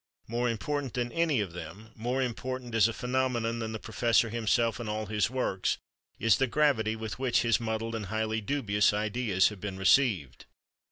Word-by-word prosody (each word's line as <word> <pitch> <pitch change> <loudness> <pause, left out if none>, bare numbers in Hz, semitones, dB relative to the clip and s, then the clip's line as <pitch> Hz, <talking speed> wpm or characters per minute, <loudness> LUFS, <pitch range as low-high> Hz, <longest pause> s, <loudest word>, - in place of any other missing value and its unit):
More 120 +2 0
important 135 +3 -3
than 120 -1 -1
any 165 -8 +1
of 95 -5 -4
them, 95 +6 -9
more 125 +4 -1
important 125 0 -4
as 115 -1 +5
a - - -2
phenomenon 125 -2 -1
than 110 -1 -3
the 110 - -3
professor 115 +1 +1
himself 115 0 +1
and 115 -3 -4
all 110 0 -2
his 105 0 0
works, 125 -7 -1 0.4
is 115 -3 +4
the 135 - +2
gravity 120 -6 +2
with 110 +1 -6
which 125 -3 +2
his 115 -1 +3
muddled 115 0 -3
and 110 -3 -4
highly 110 +1 -1
dubious 105 -5 +1
ideas 105 -2 +1
have 105 -4 -10
been 100 -2 -4
received. 95 - +2
115 Hz, 180 wpm, -29 LUFS, 105-125 Hz, 0.4 s, as